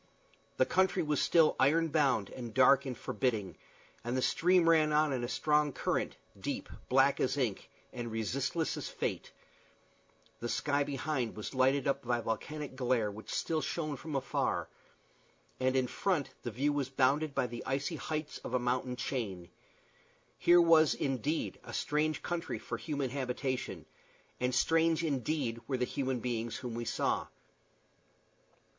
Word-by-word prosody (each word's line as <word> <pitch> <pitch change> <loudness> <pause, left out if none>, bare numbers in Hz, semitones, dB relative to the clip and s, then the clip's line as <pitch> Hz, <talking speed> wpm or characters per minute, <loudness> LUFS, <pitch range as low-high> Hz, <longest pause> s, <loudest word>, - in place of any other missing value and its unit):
The 130 - +4
country 185 +4 +2
was 150 -2 0
still 165 -2 +4
iron 160 +5 +4
bound 135 -9 +2
and 120 -4 -7
dark 135 +1 +5
and 125 -3 -4
forbidding, 110 -7 -1 0.5
and 120 +2 -1
the - - +1
stream 180 0 +3
ran 155 -2 +5
on 150 -1 +3
in 125 -2 -2
a - - -1
strong 150 +2 +2
current, - - -1 0.2
deep, - - -4 0.2
black 135 +2 +4
as 130 - +1
ink, 120 -8 -1 0.2
and 120 -2 -5
resistless 135 - -1
as - - -4
fate; - - -3 1.1
the 120 - -4
sky 145 +2 +1
behind 135 -3 -2
was 105 - -5
lighted 130 +1 +2
up 140 0 +1
by 120 -1 0
the 120 - -5
volcanic 140 +6 -4
glare 125 -5 +1
which 105 +2 -10
still 160 -1 -1
shone 155 -3 -2
from 150 +2 -6
afar; 135 -2 -1 0.9
and 130 0 +1
in 130 -1 +3
front 165 +3 -1
the 120 - -4
view 140 +6 0
was 140 -3 -1
bounded 140 +3 +2
by - - +2
the 120 -1 -6
icy 140 +5 -1
heights 155 0 -4
of 125 - -4
a - - +3
mountain 125 +1 -1
chain. 100 -10 -4 0.9
Here 175 0 +6
was, 165 -3 +6
indeed, 140 +4 -1
a - - -9
strange 150 +1 0
country 175 0 -3
for - - -5
a - - -14
human 140 -5 -2
habitation; 130 -1 -3 0.5
and 125 0 0
strange, 165 +4 +3
indeed, 135 -5 -1
were 130 - 0
the 125 - +1
human 130 -2 -2
beings 120 -2 -2
whom 125 -2 -5
we 120 +1 -4
saw. - - 0
135 Hz, 160 wpm, -32 LUFS, 125-150 Hz, 1.1 s, Here